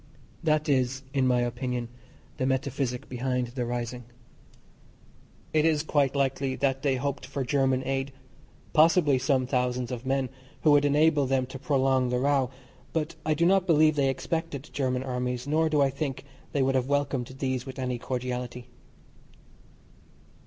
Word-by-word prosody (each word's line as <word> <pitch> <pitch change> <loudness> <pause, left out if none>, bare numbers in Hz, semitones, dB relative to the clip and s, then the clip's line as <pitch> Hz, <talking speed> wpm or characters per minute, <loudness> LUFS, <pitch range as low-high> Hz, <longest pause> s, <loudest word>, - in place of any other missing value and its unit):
That 155 -1 +1
is, 130 -1 +1
in 135 -2 +2
my 125 -1 +3
opinion, 120 0 -2 0.5
the 130 - 0
metaphysic 130 -1 -1
behind 125 -1 -2
the 120 -1 -3
rising. 120 0 -4 1.5
It 155 -1 +4
is 155 -2 +2
quite 145 -3 +1
likely 135 -1 0
that 135 -1 0
they 140 -2 +1
hoped 140 +1 -3
for 140 - -3
German 130 -1 +1
aid, 135 0 -1 0.6
possibly 155 -4 +5
some 130 -1 +1
thousands 125 -1 -1
of 125 -1 -5
men, 135 -1 0 0.3
who 155 - +6
would 145 0 +5
enable 145 0 +3
them 130 -1 +1
to 130 +1 -9
prolong 135 -2 +2
the 125 - 0
row, 135 -1 +2 0.4
but 160 0 -1
I 155 - +3
do 170 +2 +2
not 190 +1 +3
believe 155 -2 +5
they 140 -2 +2
expected 150 +2 -3
German 130 -2 0
armies, 125 -1 -3
nor 155 +2 +2
do 150 -2 +2
I 135 - +2
think 135 -1 -4 0.3
they 140 - +1
would 135 0 +2
have 130 -1 +1
welcomed 140 -3 0
these 130 -1 -2
with 130 - -7
any 125 -2 -2
cordiality. 125 -1 -4
135 Hz, 160 wpm, -27 LUFS, 125-145 Hz, 1.5 s, who